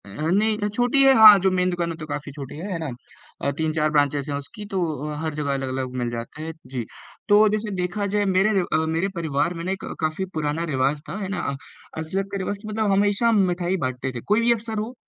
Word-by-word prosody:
अ, - - -12
नहीं 190 - +1
अ, - - +2
छोटी 245 +6 +2
है 270 0 +7
हाँ, 215 -2 +10
जो 190 +1 +3
मेन 180 0 +1
दुकान 175 -1 -1
है, - - -3
वो - - -11
तो 155 - -6
काफ़ी 145 0 -5
छोटी 140 0 -8
है, 190 +6 -5
है 175 - -1
ना? 160 -3 -3 0.5
अ, 140 - 0
3-4 155 -1 +1
ब्रांचेज़ 145 -1 +1
हैं 140 - -1
उसकी, 205 +9 -9
तो 200 -2 -3 0.3
अ, - - -4
हर 160 -1 -2
जगह 145 -2 -1
अलग-अलग 130 -1 -3
मिल 120 - -1
जाते 120 +6 -6
हैं, 160 0 -5
जी। 125 -2 -4 0.5
तो 210 +1 +7
जैसे 215 0 -2
देखा 180 +3 -2
जाए 205 0 +2
मेरे 190 +2 +3
र - - -2
अ, 160 +1 +2
मेरे 175 +4 +1
परिवार 160 -1 0
में 165 -1 -6
ना 185 - -2
एक 190 - -4 0.2
काफ़ी 155 +4 -1
पुराना 155 +1 -1
रिवाज़ 135 +3 +1
था - - -4
है 195 - -3
ना, 175 -7 -2 0.4
असलत 190 +5 -3
का 200 - -2
रिवाज़ 195 +1 -3
कि 215 - -9
मतलब 215 -1 0
हमेशा 205 +3 +2
हम 230 -2 +4
मिठाई 180 +1 -1
बाँटते 130 +1 -3
थे। 120 - -4
कोई 220 - +3
भी 235 +1 +3
अवसर 225 -1 -5
हो, 220 +4 -4
175 Hz, 250 wpm, -23 LUFS, 145-205 Hz, 0.5 s, हाँ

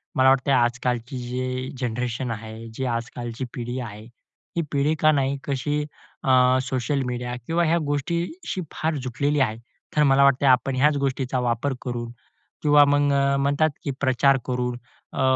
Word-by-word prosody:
मला 130 0 +5
वाटतंय 135 +1 +3
आजकालची 120 +1 0
जी 130 +2 -3
जनरेशन 125 0 -2
आहे, 110 +1 -7
जी 130 +3 -3
आजकालची 120 +1 -4
पिढी 120 +1 -4
आहे, 105 -3 -7 0.5
ही - - +3
पिढी 145 +2 +1
का 155 - +5
नाही, 140 -1 +1
कशी 145 +2 -1 0.4
अ, 130 -1 +5
सोशल 130 +2 -1
मीडिया 125 0 -3
किंवा 170 +1 +1
ह्या 165 +2 +3
गोष्टीशी 170 - -2
फार 160 0 -1
जुटलेली 140 +4 0
आहे. 110 -5 +1 0.4
तर 150 - +4
मला 140 -1 +5
वाटतंय, 140 0 +4
आपण 130 +1 +3
ह्याच 145 +2 +3
गोष्टीचा 130 -1 -1
वापर 125 +3 0
करून 120 -2 -4 0.5
किंवा 145 -1 +6
मग 145 0 +3
अ, 140 0 +2
म्हणतात, 145 +3 +2
की 140 - -2
प्रचार 135 +1 +3
करून, 125 -1 -2 0.4
अ, - - -2
130 Hz, 155 wpm, -24 LUFS, 125-140 Hz, 0.5 s, किंवा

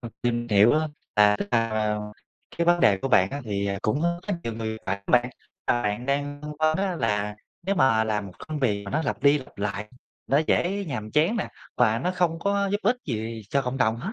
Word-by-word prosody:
ờ, 120 - -6
tìm 120 -1 0
hiểu 105 +2 +6
á, 155 - +4 0.4
là 105 0 +6
tức 100 - -3
là, 115 -1 +2
à, 110 -1 0 0.6
cái 170 - +2
vấn 175 0 +4
đề 100 - +5
của 135 - -3
bạn 95 -7 +4
á 140 - -4
thì 100 -2 -2
cũng, 140 +8 0
ơ, 170 0 0
rất 200 - +1
nhiều 115 - -3
người, 110 0 -4
phải 95 +1 0
không 100 - -7
bạn? 125 0 +4 0.3
Ờ, 120 - +1
bạn 105 +4 -2
đang 145 +1 -1
phân 150 - -5
vân 155 0 +3
á 190 -2 -1
là 105 -5 0 0.3
nếu 195 +3 0
mà 125 - +4
làm 105 -2 -1
một 95 - -10 0.2
công 155 - -3
việc 105 -7 0
mà 100 - -6
nó 155 - 0
lặp - - -3
đi 145 +1 +5
lặp 130 - -13
lại, 105 +1 -3 0.4
nó 140 - +3
dễ 200 +3 +1
nhàm 110 -9 -5
chán 160 - +2
nè, 205 - -2 0.3
và 115 -2 +3
nó 180 - -1
không 175 -3 +1
có 200 +2 +1
giúp 205 - +2
ích 240 +5 +3
gì 110 -3 -4
cho 140 - +2
cộng 125 +1 -3
đồng 110 -3 +2
hết, 185 - -5
120 Hz, 245 wpm, -25 LUFS, 105-155 Hz, 0.6 s, hiểu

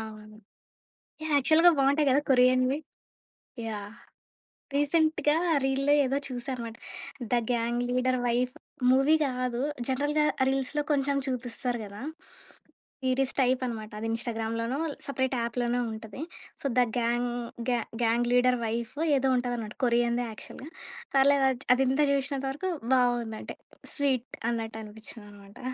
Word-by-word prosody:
అవును. 215 -1 -10 0.9
యాహ్! 315 - -2
యాక్చువల్‌గా 320 +5 +6
బాగుంటాయి 280 +2 +3
గదా! 280 +3 +4
కొరియన్‌వి. 255 +2 +4 0.9
యాహ్! 210 +1 -6 0.8
రీసెంట్‌గా 310 +1 +2 0.3
రీల్‌లో 270 +2 +2
ఏదో 270 +2 0
చూసానన్నమాట. 245 -2 -5 0.5
'The - - +4 0.2
gang 240 +1 0
leader 255 0 +1
wife' 250 +2 0 0.4
movie 270 +4 +5
గాదు. 250 -2 -2 0.3
జనరల్‌గా 290 +3 +1 0.2
రీల్స్‌లో 270 +2 0
కొంచెం 280 0 +1
చూపిస్తారు 245 -1 -2
గదా! 200 +3 -10 1.0
సీరీస్ 260 +1 +1
టైప్ 255 0 +2
అనమాట. 220 -2 -6
అది 225 - -3
ఇన్‌స్టాగ్రామ్‌లోనో, 230 +2 -2 0.3
సెపరేట్ 260 -1 -1
యాప్‌లోనో 240 +1 0
ఉంటది. 220 +4 -8 0.4
So, - - -11
'the - - +7 0.2
gang 240 +1 +1 0.4
గ్యా-గ్యాంగ్ 235 0 0
leader 250 0 +4
wife' 230 +3 -3 0.2
ఏదో 265 0 +1
ఉంటది 245 0 -1
అన్నమాట. 215 -2 -6
కొరియన్‌దే 240 0 +2
యాక్చువల్‌గా. 265 +6 -10 0.5
పర్లేదు 275 0 +5
అది 255 +1 -6
అది 270 - +2
ఇంతా 290 +3 +3
చూసినంత 275 0 -1
వరకు 345 +7 -3 0.3
బాగుందంటే 240 -3 0 0.4
స్వీట్. 265 -4 0 0.2
అన్నట్టు 225 -1 -3
అనిపించిందనమాట. 205 -2 -12
250 Hz, 120 wpm, -28 LUFS, 230-270 Hz, 1.0 s, The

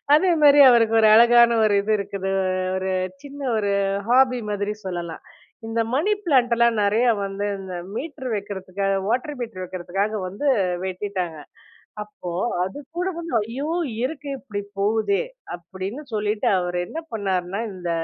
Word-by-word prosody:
அதே 360 +3 +3
மாதிரி 290 0 +7
அவருக்கு 230 -2 +4
ஒரு 215 - +6
அழகான 235 0 +6
ஒரு 205 - +2
இது 215 - -1
இருக்குது, 195 -1 -3 0.5
ஒரு 190 0 -2 0.3
சின்ன 285 0 -9 0.2
ஒரு 200 -1 0 0.4
ஹாபி 255 -1 +4
மாதிரி 205 +1 -2
சொல்லலாம். 175 -2 -5 0.4
இந்த 230 0 0
மணி 320 +10 +2
பிளான்ட்லாம் 235 -6 +3
நெறைய 210 +4 +2 0.2
வந்து 195 +1 -3
இந்த 190 -1 -8 0.2
மீட்டர் 265 -3 -5
வைக்கிறதுக்காக, 195 -1 -3
வாட்டர் 260 +6 -1
மீட்டர் 230 -6 -5
வைக்கிறதுக்காக 190 +4 -3
வந்து 200 +10 -5 0.4
வெட்டிட்டாங்க. 185 -3 -4 0.6
அப்போ 195 -4 -9 0.3
அது 190 +6 -5 0.2
கூட 360 +2 0
வந்து, 335 -3 -6 0.2
"ஐயோ! 275 +6 -4 0.4
இருக்கு 285 +1 -4
இப்டி 210 -7 -6 0.2
போகுதே," 210 -1 +1 0.4
அப்டின்னு 190 - -7
சொல்லிட்டு 210 0 -1
அவர் 180 0 -2
என்ன 320 - -6
பண்ணாருன்னா, 195 -2 -2
இந்த 180 -2 -6
210 Hz, 135 wpm, -23 LUFS, 190-245 Hz, 0.6 s, மாதிரி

